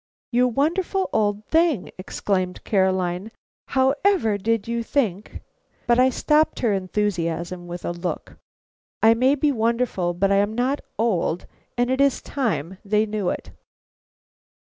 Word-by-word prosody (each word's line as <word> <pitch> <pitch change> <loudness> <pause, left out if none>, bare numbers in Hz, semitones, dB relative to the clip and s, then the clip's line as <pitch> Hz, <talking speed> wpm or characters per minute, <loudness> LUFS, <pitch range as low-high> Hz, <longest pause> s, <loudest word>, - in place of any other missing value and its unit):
"You 250 +1 +3
wonderful 345 - 0
old 210 0 0
thing!" 320 - +1
exclaimed 185 -1 -2
Caroline. 190 0 0 0.4
"How 265 0 +3
ever 370 - +3
did 225 +1 0
you 235 0 -1
think 220 -6 -2 0.2
" - - -39
But 240 +1 +3
I 255 +1 +6
stopped 300 +4 +1
her 230 -5 +2
enthusiasm 180 -3 -2
with 175 0 -7
a - - -1
look. 175 +1 -5 0.6
I 225 +1 +7
may 255 +4 +3
be 295 +1 +2
wonderful, 225 -7 0
but 195 +3 +1
I 200 - +4
am 205 +2 +1
not 255 +4 0 0.2
old, 185 -6 0 0.3
and 245 +1 +1
it 260 +1 +1
is 280 -1 +3
time 190 - -3
they 210 +1 +2
knew 210 -3 -2
it. - - -5
220 Hz, 145 wpm, -23 LUFS, 185-255 Hz, 0.6 s, I